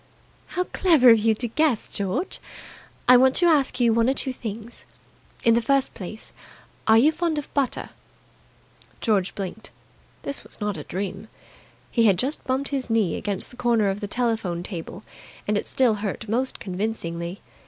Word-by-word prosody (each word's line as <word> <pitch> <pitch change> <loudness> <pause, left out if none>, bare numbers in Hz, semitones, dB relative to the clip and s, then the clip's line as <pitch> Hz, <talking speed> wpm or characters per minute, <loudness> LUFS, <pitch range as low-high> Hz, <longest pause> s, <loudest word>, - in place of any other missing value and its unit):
"How 360 - +3
clever 320 -10 +5
of 225 - +6
you 220 +1 +3
to 240 +3 -3
guess. 275 -1 +1
George, 205 - -3 0.7
I 250 - +9
want 260 +1 +4
to 355 - +4
ask 300 -7 +3
you 235 -2 +4
one 230 +2 +3
or 270 - +1
two 265 -1 -1
things. 225 0 -8 0.6
In 230 - +5
the 235 - +3
first 275 +2 +2
place, 215 +3 -7 0.5
are 220 0 +7
you 280 +7 +5
fond 325 -1 -1
of 295 - -5
butter?" 275 -3 -1 1.1
George 200 -5 +1
blinked. 200 +2 -5 0.5
This 280 - -1
was - - -12
not 210 -2 -2
a 150 - -7
dream. 195 +2 -5 0.6
He 230 -2 +3
had 200 -4 +5
just 270 - -1
bumped 265 +2 -1
his 270 -3 -2
knee 220 -7 +2
against 200 -2 -2
the 245 - -15
corner 235 -4 +2
of 195 +1 -2
the 205 - -4
telephone 220 -7 -1
table, 180 +1 -7 0.4
and 210 - +1
it 205 - -1
still 255 -4 +3
hurt 210 +1 -4
most 250 +5 -1
convincingly. 180 -2 -4
225 Hz, 175 wpm, -24 LUFS, 205-260 Hz, 1.1 s, I